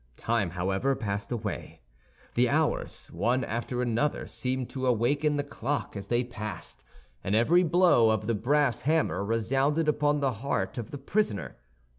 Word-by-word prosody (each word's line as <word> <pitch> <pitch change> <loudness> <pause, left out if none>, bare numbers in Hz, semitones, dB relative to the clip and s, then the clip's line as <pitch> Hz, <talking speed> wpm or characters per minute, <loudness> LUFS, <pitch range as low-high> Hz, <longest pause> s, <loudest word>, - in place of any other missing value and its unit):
Time, 115 -5 0
however, 95 +10 0
passed 100 -2 -4
away; 110 -5 -4 0.5
the - - +3
hours, - - 0
one 120 +10 +1
after 120 +2 -2
another, 125 +5 0
seemed 130 -1 -3
to 130 -1 -3
awaken 140 +6 +2
the 145 - 0
clock 140 -2 -3
as 100 -1 -6
they 120 +2 +1
passed, 105 -6 -7 0.4
and 100 - 0
every 160 +11 +5
blow 170 -9 +4
of 110 -1 0
the 115 - +1
brass 130 +4 +1
hammer 155 -8 +1
resounded 135 +9 +1
upon 150 -1 +2
the 135 -2 +1
heart 120 -6 -1
of 115 - -6
the 145 - -6
prisoner. 140 - -1
125 Hz, 155 wpm, -28 LUFS, 110-145 Hz, 0.5 s, every